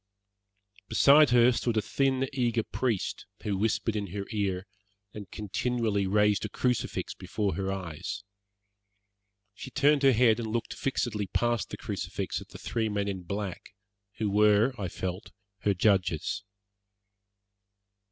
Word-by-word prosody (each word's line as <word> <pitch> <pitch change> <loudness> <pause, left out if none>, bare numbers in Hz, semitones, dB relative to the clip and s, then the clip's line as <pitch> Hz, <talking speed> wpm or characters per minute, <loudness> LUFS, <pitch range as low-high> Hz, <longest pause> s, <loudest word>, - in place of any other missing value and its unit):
Beside 145 +1 +6
her 120 0 +6
stood 120 -1 -1
a - - +4
thin, 135 -1 +1
eager 120 -3 +1
priest, 115 -5 -2 0.2
who 105 -2 -1
whispered 110 +2 0
in 105 -1 -2
her 100 +2 -5
ear, 100 -3 -1 0.5
and 100 -4 -8
continually 105 -1 -1
raised 105 +1 +3
a 105 - -3
crucifix 125 +3 -1
before 105 -2 -2
her 95 0 -2
eyes. 95 +2 -5 1.3
She - - -8
turned 145 +1 +3
her 135 -2 +6
head 115 -1 +4
and 110 -2 -3
looked 115 0 -2
fixedly 110 -6 -2
past 120 +1 0
the - - -6
crucifix - - -4
at - - -11
the - - -10
three 110 -2 -2
men 100 -1 -1
in 95 -2 -3
black, 100 +1 -5 0.4
who 110 - 0
were, 105 +4 +4
I 100 -6 -3
felt, 90 +3 -5 0.3
her 100 -1 +1
judges. 90 -3 +1
105 Hz, 140 wpm, -29 LUFS, 100-120 Hz, 1.3 s, Beside